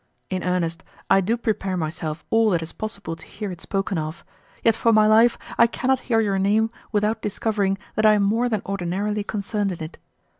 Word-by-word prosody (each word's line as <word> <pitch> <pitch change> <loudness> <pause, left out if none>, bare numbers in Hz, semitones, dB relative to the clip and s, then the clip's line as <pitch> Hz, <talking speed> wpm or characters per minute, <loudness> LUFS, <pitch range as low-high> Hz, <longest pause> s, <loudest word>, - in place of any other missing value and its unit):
In 185 -1 -1
earnest, 170 -2 -1 0.3
I 195 - +6
do 220 +6 0
prepare 195 -5 -1
myself 155 -1 -4
all 225 -1 +4
that 170 -4 +1
is 160 - -6
possible 200 -6 -5
to 160 - -14
hear 205 -2 -6
it 175 - -9
spoken 195 -2 -1
of, 155 +1 -6 0.4
yet 230 - +5
for 230 0 +2
my 215 -1 +5
life 225 +2 +5 0.2
I 235 - +7
cannot 260 +2 0
hear 225 -2 +4
your 200 -3 0
name 215 +3 +2 0.2
without 210 +1 +1
discovering 205 -1 0 0.2
that 215 0 +3
I 215 - +7
am 205 -1 +3
more 225 +5 +2
than 215 -4 -1
ordinarily 200 +2 -2
concerned 205 -1 -2
in't. 160 +1 -8
205 Hz, 195 wpm, -23 LUFS, 180-220 Hz, 0.4 s, I